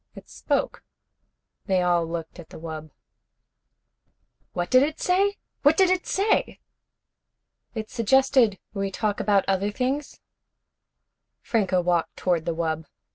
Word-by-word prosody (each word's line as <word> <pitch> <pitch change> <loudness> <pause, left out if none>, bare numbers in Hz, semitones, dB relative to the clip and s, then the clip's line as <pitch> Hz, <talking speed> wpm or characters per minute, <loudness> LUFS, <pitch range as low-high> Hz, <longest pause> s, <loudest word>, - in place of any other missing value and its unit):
"It - - -12
spoke." - - -2 0.9
They 185 -2 +2
all 175 -1 +2
looked 165 0 -6
at 165 - -11
the - - -11
wub. 155 -1 -7 1.6
"What 175 0 -3
did 255 - +7
it 300 +3 -1
say? 395 +3 +2 0.2
What 295 +2 +4
did 375 -1 +5
it 370 -1 0
say?" 400 +3 +1 1.2
"It 215 -1 -5
suggested 250 -2 +3 0.2
we 195 -1 -2
talk 205 +1 -2
about 200 -2 +2
other 195 +1 +1
things." 265 +6 -3 1.2
Franco 195 -5 +1
walked 175 -1 0
toward 175 -3 0
the 170 - -1
wub. 160 -1 -2
200 Hz, 130 wpm, -25 LUFS, 175-265 Hz, 1.6 s, did